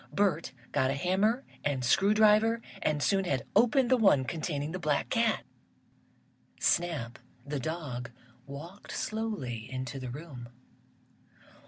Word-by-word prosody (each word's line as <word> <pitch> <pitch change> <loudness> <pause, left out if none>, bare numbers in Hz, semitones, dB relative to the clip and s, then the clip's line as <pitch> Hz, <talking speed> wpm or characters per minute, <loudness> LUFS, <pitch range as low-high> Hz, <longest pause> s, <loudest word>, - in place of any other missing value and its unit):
Bert 175 -8 +1 0.2
got 130 - +2
a 135 - 0
hammer 195 - +1 0.2
and 135 -3 0
screw 195 - +4
driver 215 +2 +5 0.2
and 150 -1 0
soon 195 -1 +2
had 135 -7 -1
opened 245 +1 +4
the 255 - +6
one 195 - +5
containing 150 -1 -3
the 185 - -4
black 150 -4 0
cat. 230 -2 +2 1.2
Snap, 155 -9 0 0.3
the 145 0 -3
dog, 130 -5 -4 0.4
walked 165 +8 -9
slowly 200 - -3
into 130 +1 -4
the 130 -1 -5
room. 130 -3 -8
160 Hz, 130 wpm, -30 LUFS, 135-210 Hz, 1.2 s, the